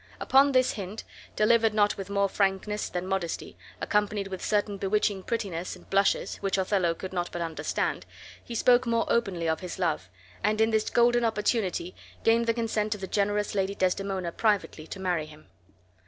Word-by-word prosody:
Upon 275 Hz, +2 st, +5 dB
this 255 Hz, -1 st, +3 dB
hint, 200 Hz, +1 st, -6 dB, 0.3 s
delivered 225 Hz, 0 st, +3 dB
not 205 Hz, -1 st, +3 dB
with 195 Hz, -1 st, -7 dB
more 200 Hz, 0 st, +2 dB
frankness 195 Hz, +1 st, -1 dB
than 180 Hz, 0 st, -3 dB
modesty, 190 Hz, -3 st, -3 dB, 0.2 s
accompanied 205 Hz, -1 st, 0 dB
with 190 Hz, -1 st, -6 dB
certain 205 Hz, -1 st, 0 dB
bewitching 200 Hz, 0 st, +1 dB
prettiness 185 Hz, -5 st, -3 dB
and -, -, -17 dB
blushes, 195 Hz, 0 st, +2 dB
which 195 Hz, 0 st, -1 dB
Othello 185 Hz, -3 st, +1 dB
could 190 Hz, +2 st, -7 dB
not 175 Hz, -1 st, -2 dB
but 175 Hz, -, -3 dB
understand, 165 Hz, -1 st, -2 dB, 0.4 s
he 235 Hz, -, -7 dB
spoke 245 Hz, +2 st, +4 dB
more 230 Hz, 0 st, +2 dB
openly 190 Hz, -8 st, 0 dB
of 160 Hz, 0 st, 0 dB
his 180 Hz, -2 st, -6 dB
love, 160 Hz, -, -1 dB, 0.3 s
and 215 Hz, +2 st, +1 dB
in 220 Hz, +1 st, +3 dB
this 220 Hz, -1 st, +1 dB
golden 240 Hz, 0 st, +3 dB
opportunity 210 Hz, -5 st, 0 dB, 0.3 s
gained 230 Hz, +1 st, +3 dB
the 230 Hz, -, +3 dB
consent 220 Hz, -2 st, -1 dB
of 205 Hz, -, -11 dB
the -, -, -2 dB
generous 205 Hz, +1 st, 0 dB
Lady 195 Hz, 0 st, 0 dB
Desdemona 185 Hz, -1 st, -1 dB
privately 200 Hz, -6 st, 0 dB
to 195 Hz, -, -7 dB
marry 175 Hz, -5 st, -1 dB
him. 155 Hz, -8 st, -16 dB
200 Hz, 175 wpm, -27 LUFS, 185-220 Hz, 0.4 s, Upon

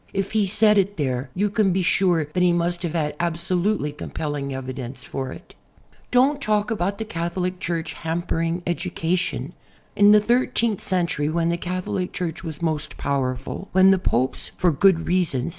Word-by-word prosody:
If 195 Hz, 0 st, -2 dB
he 215 Hz, -2 st, +2 dB
said 210 Hz, +1 st, +4 dB
it 200 Hz, +1 st, 0 dB
there 130 Hz, -3 st, -1 dB
you 200 Hz, +2 st, +1 dB
can 200 Hz, -2 st, +2 dB
be 185 Hz, +1 st, +1 dB
sure 175 Hz, -3 st, +2 dB
that 150 Hz, +5 st, -2 dB
he 180 Hz, -1 st, +5 dB
must 175 Hz, 0 st, 0 dB
have 170 Hz, -2 st, -3 dB
had 150 Hz, -3 st, -1 dB
absolutely 170 Hz, 0 st, 0 dB
compelling 145 Hz, -1 st, -4 dB
evidence 130 Hz, -1 st, -6 dB
for 130 Hz, 0 st, -5 dB
it. -, -, -12 dB, 0.6 s
Don't 275 Hz, +4 st, +3 dB
talk 215 Hz, -2 st, +1 dB
about 200 Hz, -1 st, -1 dB
the 220 Hz, -, -4 dB
Catholic 180 Hz, 0 st, -3 dB
Church 170 Hz, -2 st, -3 dB
"hamjiering 165 Hz, +1 st, -1 dB
educa 175 Hz, 0 st, -1 dB
tion." 185 Hz, -, -3 dB, 0.4 s
In 205 Hz, 0 st, +6 dB
the 210 Hz, -, +8 dB
thirteenth 235 Hz, -1 st, +1 dB
century, 170 Hz, -5 st, 0 dB
when 165 Hz, +1 st, +1 dB
the 170 Hz, -, +1 dB
Catholic 180 Hz, +1 st, -3 dB
Church 175 Hz, -3 st, -4 dB
was 160 Hz, -1 st, -6 dB
most 155 Hz, -3 st, -2 dB
powerful, 135 Hz, +6 st, -2 dB
when 190 Hz, +1 st, +6 dB
the 190 Hz, -, +3 dB
Popes 130 Hz, -7 st, 0 dB
for 180 Hz, -, +3 dB
good 165 Hz, +2 st, +3 dB
reasons. 170 Hz, -8 st, +1 dB
175 Hz, 175 wpm, -23 LUFS, 155-195 Hz, 0.6 s, the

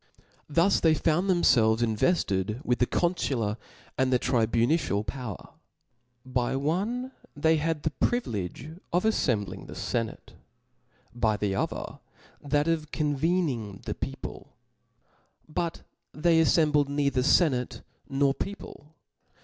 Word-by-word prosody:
Thus 170 Hz, +6 st, +3 dB
they 160 Hz, -1 st, +4 dB
found 170 Hz, +5 st, +1 dB
thcmfelves 115 Hz, -11 st, +4 dB
invcfted 110 Hz, -, 0 dB
with 125 Hz, -, +1 dB
the 125 Hz, -, +3 dB
confular 130 Hz, -, 0 dB, 0.4 s
and 130 Hz, 0 st, +2 dB
the 125 Hz, -, +5 dB
tribu 115 Hz, -2 st, +2 dB
nitian 120 Hz, -8 st, 0 dB
power, 125 Hz, -5 st, -6 dB, 0.8 s
By 130 Hz, 0 st, -1 dB
one 200 Hz, -, -1 dB, 0.3 s
tb^y 160 Hz, +1 st, +3 dB
had 160 Hz, -1 st, -1 dB
the 155 Hz, -, 0 dB
privilege 130 Hz, -, -2 dB, 0.2 s
of 175 Hz, +1 st, +2 dB
aflembling 125 Hz, -, 0 dB
the -, -, -9 dB
fenate, 115 Hz, -2 st, -3 dB, 0.8 s
by 110 Hz, -3 st, +1 dB
the 105 Hz, -2 st, -1 dB
Other 95 Hz, -, -3 dB, 0.4 s
that 145 Hz, +1 st, +1 dB
of 155 Hz, -2 st, -1 dB
con 150 Hz, -2 st, 0 dB
^ -, -, -10 dB
vcning 135 Hz, -, -1 dB
the -, -, -3 dB
people; -, -, -7 dB, 0.9 s
but 165 Hz, +2 st, -3 dB, 0.3 s
they 165 Hz, +1 st, +3 dB
aflcmblcd 150 Hz, -3 st, +3 dB
neither 140 Hz, -2 st, +1 dB
fenate 130 Hz, -3 st, +3 dB
^ -, -, -28 dB, 0.3 s
nor 135 Hz, 0 st, +2 dB
people. 160 Hz, -4 st, -8 dB
145 Hz, 125 wpm, -27 LUFS, 120-165 Hz, 0.9 s, the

